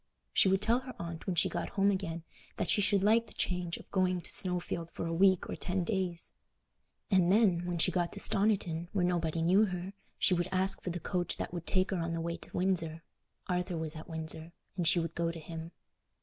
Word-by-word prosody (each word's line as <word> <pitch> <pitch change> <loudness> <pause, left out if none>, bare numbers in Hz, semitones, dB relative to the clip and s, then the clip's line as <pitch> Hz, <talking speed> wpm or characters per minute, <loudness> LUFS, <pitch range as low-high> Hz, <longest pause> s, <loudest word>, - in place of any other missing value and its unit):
She 190 - +5
would 190 +1 +2
tell 235 +2 +3
her 255 -2 -9
aunt 170 +1 -6
when 185 - 0
she - - +4
got - - -3
home 200 +1 +5
again 170 -4 -3 0.3
that 175 - +1
she 205 - +3
should 200 -1 +3
like 225 +2 +4
the - - -15
change 180 -2 -1
of - - -15
going 185 -2 +1
to - - -6
Snowfield 175 -2 -1
for - - -5
a 165 - -2
week 190 +1 +4
or - - -4
ten 180 0 -1
days. 180 -4 -1 0.8
And 185 -2 +4
then, 190 -5 +3
when 175 -1 -1
she 165 - +4
got 175 -2 0
to 200 - -5
Stoniton, 195 -6 +1
where 185 -3 +2
nobody 165 -2 0
knew 190 +6 +5
her, 185 0 -4 0.2
she - - +3
would 175 0 0
ask 190 +1 +1
for - - -4
the 175 0 -3
coach 175 +1 -2
that - - -4
would 170 -2 -5
take 185 +1 +1
her 190 - 0
on 165 0 -2
the 165 - -2
way 170 +1 -2
to - - -8
Windsor. 165 -3 0 0.4
Arthur 180 -1 -1
was 160 -1 -4
at 155 +2 -9
Windsor, 160 +1 -5 0.2
and 175 -3 0
she 175 - +4
would 165 -1 -2
go 170 0 0
to 165 - -8
him. 165 +1 -7
180 Hz, 230 wpm, -32 LUFS, 165-190 Hz, 0.8 s, She